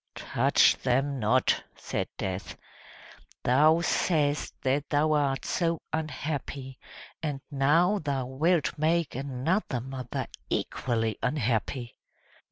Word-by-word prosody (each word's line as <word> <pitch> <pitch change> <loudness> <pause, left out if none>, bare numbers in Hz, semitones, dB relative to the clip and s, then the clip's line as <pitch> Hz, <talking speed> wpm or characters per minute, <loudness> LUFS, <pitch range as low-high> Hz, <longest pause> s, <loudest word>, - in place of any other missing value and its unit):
"Touch - - +3
them 135 +2 0
not!" 120 +4 +2
said - - -3
Death. 95 0 -4 0.9
"Thou 155 +6 +5
say'st 150 -4 0
that 135 +2 0
thou 150 +1 +2
art 140 -3 +1
so 165 -2 0
unhappy, 140 -3 -4 0.4
and 150 -4 -2
now 165 +9 +3
thou 140 -5 -2
wilt 155 +6 +1
make 165 0 +1
another 135 - -1
mother 130 0 -5 0.2
equally 115 -3 -1
unhappy." 120 -2 -1
140 Hz, 100 wpm, -28 LUFS, 130-155 Hz, 0.9 s, Thou